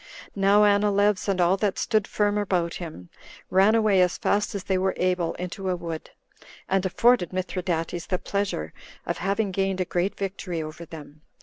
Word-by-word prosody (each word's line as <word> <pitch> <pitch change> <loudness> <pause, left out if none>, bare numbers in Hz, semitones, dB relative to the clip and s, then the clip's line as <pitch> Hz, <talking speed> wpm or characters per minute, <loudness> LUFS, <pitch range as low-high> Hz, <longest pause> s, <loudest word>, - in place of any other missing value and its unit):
Now 200 +1 +4
Anileus, 205 -1 +3
and 195 -2 0
all 180 +2 +3
that 200 -1 0
stood 215 -4 +1
firm 205 -1 +1
about 180 -4 0
him, 155 - -8 0.4
ran 195 +4 +5
away 215 -4 +4
as 180 -1 +2
fast 205 0 0
as 195 - -4
they 190 -2 0
were 190 0 0
able 180 -2 0
into 185 +2 -5
a 180 - +1
wood, 170 -2 -6 0.6
and 195 -1 +1
afforded 230 -1 +3
Mithridates 180 -2 -3
the 185 - 0
pleasure 195 - -3 0.3
of - - -3
having 200 +1 0
gained 195 0 -1
a 185 - +1
great 180 +3 -1
victory 190 -3 -4
over 155 +2 -7
them. 155 -2 -11
190 Hz, 175 wpm, -25 LUFS, 175-200 Hz, 0.6 s, ran